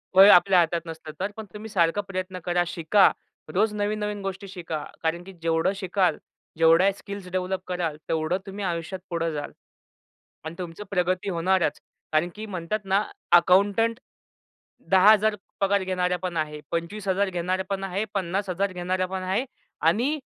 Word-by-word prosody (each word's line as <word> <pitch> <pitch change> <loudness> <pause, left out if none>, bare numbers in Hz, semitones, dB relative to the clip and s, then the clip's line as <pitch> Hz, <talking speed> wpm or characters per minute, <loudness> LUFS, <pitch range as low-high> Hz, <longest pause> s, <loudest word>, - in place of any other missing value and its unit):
वय 195 +2 +10
आपल्या 190 -1 +7
हातात 170 0 +1
नसतं. 160 -1 -8
तर 195 +2 -2
पण 220 - -6
तुम्ही 215 +1 -8
सारखा 175 -1 +2
प्रयत्न 185 -1 -4
करा, 175 0 +2
शिका. 180 +5 +4 0.4
रोज 210 +3 +2
नवीन-नवीन 210 0 -2
गोष्टी 195 +1 -5
शिका 170 -5 -5 0.2
कारण 170 +2 -1
की 195 +1 -11
जेवढं 165 +2 +2
शिकाल, 190 -1 +1 0.4
जेवढ्या 165 +4 +5
स्किल्स 200 -1 -8
डेव्हलप 185 0 -1
कराल, 175 -4 -2
तेवढं 160 +2 0
तुम्ही 200 +1 -6
आयुष्यात 170 +1 -3
पुढं 165 -2 -1
जाल. 145 -1 -4 0.9
आणि 160 - -6
तुमचं 175 +2 -6
प्रगती 180 +1 0
होणारच 175 -2 +1 0.3
कारण 155 +3 +2
की 215 +1 -6
म्हणतात 185 +1 -3
ना, 195 +2 +2 0.3
अकाउंटंट 200 +6 +4 0.9
10,000 210 +3 +6 0.3
पगार 200 0 +2
घेणारा 180 -1 0
पण 175 -2 -2
आहे. 150 -1 -2
25,000 190 +3 -1
घेणारा 185 +1 -1
पण 195 -1 -2
आहे. 195 +2 -2
50,000 190 0 -1
घेणारा 185 +1 -1
पण 185 0 -4
आहे. 195 +8 0 0.4
आणि 240 - +2
185 Hz, 150 wpm, -25 LUFS, 170-200 Hz, 0.9 s, वय